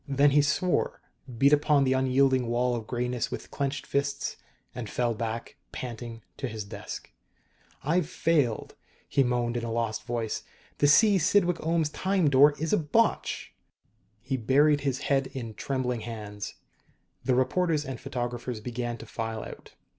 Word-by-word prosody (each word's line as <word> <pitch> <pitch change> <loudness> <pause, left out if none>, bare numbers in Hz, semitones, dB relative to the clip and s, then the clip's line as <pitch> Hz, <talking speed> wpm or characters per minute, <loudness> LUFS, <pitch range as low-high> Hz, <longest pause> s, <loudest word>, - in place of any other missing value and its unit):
Then 140 +1 +4
he 145 +1 +5
swore, 150 +5 +1 0.4
beat 140 +5 +5
upon 150 -1 +4
the 130 -1 +3
unyielding 130 -1 +3
wall 120 +1 +1
of 115 -2 -5
grayness 125 -1 -1
with - - -7
clenched 140 0 -2
fists, 140 0 -1 0.4
and 115 -4 -6
fell 120 +1 0
back, 115 +1 -4
panting, 115 -2 -6
to 130 - -3
his 110 -2 -5
desk. 100 0 -8 0.7
"I've 165 +2 +1
failed!" 145 -9 +1 0.3
he 140 - +3
moaned 120 -1 0
in 120 - -3
a 115 - -3
lost 115 -1 -1
voice. 115 -3 -2 0.4
"The 145 - +5
C. 200 +6 +6
Cydwick 180 +1 +3
Ohms 160 -2 0
Time 185 -6 +1
Door 145 +2 +6
is 160 +5 -1
a 210 - +4
botch!" 195 +9 0 0.7
He 130 +2 -1
buried 145 +5 +4
his 135 -1 -1
head 135 -2 +1
in 115 -4 -5
trembling 125 -1 -2
hands. 105 -2 -6 0.7
The 130 - +2
reporters 155 +3 +1
and 135 -3 -6
photographers 120 -1 -4
began 120 +1 -4
to 115 - -10
file 115 0 -4
out. - - -11
130 Hz, 155 wpm, -28 LUFS, 120-145 Hz, 0.7 s, C